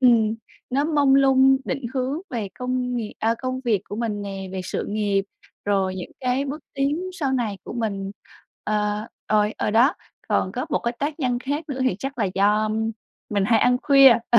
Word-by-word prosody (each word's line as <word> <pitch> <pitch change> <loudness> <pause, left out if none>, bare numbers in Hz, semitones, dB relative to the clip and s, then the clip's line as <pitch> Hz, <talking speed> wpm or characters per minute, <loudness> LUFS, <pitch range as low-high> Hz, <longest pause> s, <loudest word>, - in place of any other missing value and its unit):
ừm, 230 -4 +5 0.4
nó 280 +3 +1
mông 290 -4 +4
lung 270 -1 +6
định 265 -1 -3
hướng 265 +5 -1
về 225 -5 -3
công 250 0 -1
nghiệp 220 -3 -3
à, 225 +1 +2
công 255 0 -3
việc 215 -5 +2
của 205 - -7
mình 220 -3 -2
nè, 195 -1 -5
về 190 - -3
sự - - -3
nghiệp, 205 -2 +1 0.4
rồi 195 -2 +1
những 180 - -6
cái 255 +2 +1
bước 285 +3 -5
tiến 275 +4 0
sau 285 -8 -1
này 220 -6 -1
của - - -7
mình, 200 -4 -2 0.5
ờ, 210 0 0 0.2
rồi, 210 0 +2
ờ, - - 0
đó. 245 - +5 0.3
Còn - - +1
có - - -3
một - - +2
cái 235 - -2
tác 295 +2 -2
nhân 245 -2 +1
khác 285 +5 -3
nữa 265 -2 -4
thì 225 -8 +1
chắc 270 -1 -5
là 220 - +2
do, 205 +2 +3
ưm, 220 +1 -1 0.4
mình 200 -2 +1
hay 225 -1 +4
ăn 250 0 +4
khuya. 275 -3 +8 0.2
Ờ, 235 - +7
240 Hz, 205 wpm, -23 LUFS, 210-270 Hz, 0.5 s, khuya